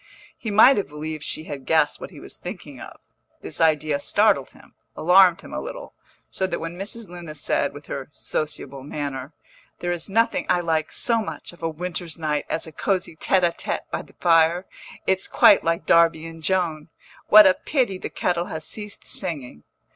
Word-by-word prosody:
He 225 - -6
might 220 +6 +7
have 205 - -1
believed 155 +1 -6
she 155 - -3
had 140 -4 -8
guessed 160 -2 +2
what - - -6
he - - -13
was - - -8
thinking - - -9
of. - - -11 0.4
This - - -4
idea 155 -2 +2
startled - - +2
him, - - -20 0.2
alarmed 180 +1 +5
him - - -11
a - - -3
little, - - -8 0.4
so 190 - -1
that 170 -2 -2
when 165 +1 -5
Mrs. 205 +4 -4
Luna 170 -3 -9
said, 145 -1 0
with 145 +1 -12
her 135 0 -6
sociable 140 -3 -5
manner, 140 -1 -5 0.5
"There 175 - -2
is 175 +2 -3
nothing 230 +3 +1
I 180 - +3
like 160 -2 -1
so 230 -2 +1
much, 210 - -7
of 175 - -18
a 165 - -1
winter's 175 0 -4
night, 150 -2 -2
as 165 - 0
a 160 - -9
cosy 180 0 -1
tête 185 +4 +1
à 170 -1 +2
tête - - -4
by - - -2
the - - -18
fire. 170 +1 +3 0.4
It's 190 0 +1
quite 200 - +6
like 165 +2 0
Darby 165 -1 +4
and 165 0 -9
Joan; 165 -3 0 0.4
what 215 0 +10
a 190 - +7
pity 235 -3 -1
the - - -5
kettle 175 -1 -1
has 160 -2 -6
ceased 210 -1 -7
singing!" 145 - -4
165 Hz, 190 wpm, -23 LUFS, 155-190 Hz, 0.5 s, what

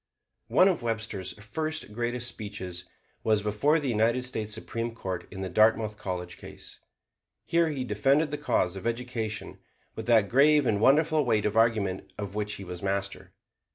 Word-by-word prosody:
One 185 - +5
of 185 -7 +1
Webster's 110 -5 -3
first 155 +5 -4
greatest 120 +1 -2
speeches 100 -6 -6 0.4
was 110 -2 +2
before 105 +10 +2
the 145 -4 -2
United 115 +3 +2
States 110 -4 -3
Supreme 115 +1 -3
Court 95 -5 -5
in 95 - -7
the 95 - -2
Dartmouth 110 +2 +3
College 90 -3 -5
case. - - -11 0.7
Here 170 -1 +2
he 140 -4 -2
defended 135 +7 +2
the 150 - -2
cause 115 -10 +1
of 95 +4 -4
education 115 -2 -3 0.4
with 110 0 -6
that 110 -4 +5
grave 145 +5 +5
and 105 -2 +1
wonderful 155 +4 +4
weight 110 -4 +1
of 105 +1 0
argument 110 -5 +1
of 100 -2 -5
which 105 0 -2
he 100 - -8
was 90 -1 -7
master. 100 0 -3
110 Hz, 165 wpm, -28 LUFS, 100-125 Hz, 0.7 s, One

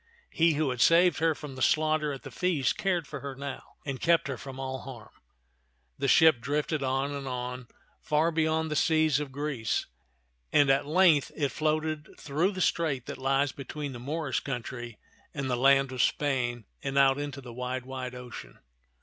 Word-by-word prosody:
He 165 0 +3
who 145 -3 +1
had 125 -2 -3
saved 170 +3 +5
her 160 -1 +2
from 145 -2 -8
the 130 - -8
slaughter 155 0 +2
at 135 - -7
the - - -9
feast 180 -7 0
cared 180 -4 0
for 140 0 -7
her 140 0 -6
now, 140 0 -6 0.2
and 135 -3 -4
kept 170 -4 +3
her 135 - -2
from 135 +2 -9
all 130 0 -4
harm. 120 -6 -10 0.9
The 140 - 0
ship 155 -2 +6
drifted 150 +2 -1
on 135 +1 0
and 140 -1 -5
on, 125 -1 -4 0.3
far 155 +2 +2
beyond 160 0 0
the - - -1
seas 155 -2 +3
of 145 -2 -5
Greece, 135 -7 -2 0.7
and 145 -2 +5
at 135 +1 +1
length 160 -3 +4
it 145 -3 0
floated 155 0 -1
through 160 +8 0
the 185 - -4
strait 150 -8 0
that - - -7
lies 135 +1 +1
between 140 +2 -6
the 120 - -7
Moorish 145 +2 -2
country 120 -3 -6 0.4
and 135 -3 -2
the - - +2
land 135 +1 +4
of 130 -2 -1
Spain 125 -5 0 0.2
and 135 0 -3
out 135 0 +5
into 145 -1 -4
the 125 -3 -10
wide, 125 +1 -4
wide 130 -1 -6
ocean. 125 -1 -9
140 Hz, 185 wpm, -28 LUFS, 130-155 Hz, 0.9 s, ship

